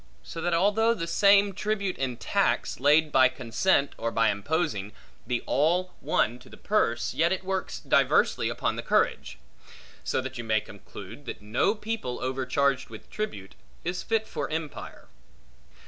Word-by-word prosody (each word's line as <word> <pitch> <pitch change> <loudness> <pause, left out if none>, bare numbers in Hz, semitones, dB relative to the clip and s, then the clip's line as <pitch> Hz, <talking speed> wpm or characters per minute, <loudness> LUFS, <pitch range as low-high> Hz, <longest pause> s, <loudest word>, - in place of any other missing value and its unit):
So 165 - -7
that 175 0 +1
although 215 +6 +3
the 165 -6 -3
same 200 +3 +4
tribute 200 -1 -2
and 125 -3 -2
tax, 115 - 0
laid 150 +3 +4
by 130 -2 +6
consent 130 +5 +1
or 115 - -1
by 115 0 +2
imposing, 105 - -2 0.3
be 125 -1 -1
all 175 +5 +1
one 120 +3 0
to 125 - -16
the - - -13
purse, 120 - 0
yet 170 +2 +2
it 190 0 -1
works 190 - -3
diversely - - +2
upon - - -2
the - - -2
courage. - - 0 0.7
So - - 0
that 130 -1 -7
you - - -3
may 110 -1 +2
conclude, 105 +4 -11
that - - -7
no 120 - +1
people 210 - -4
overcharged 130 +1 0
with - - -12
tribute, 155 - -5 0.3
is 175 +2 -2
fit 225 -1 0
for 145 - -4
empire. 155 -2 -6
145 Hz, 160 wpm, -27 LUFS, 120-190 Hz, 0.7 s, by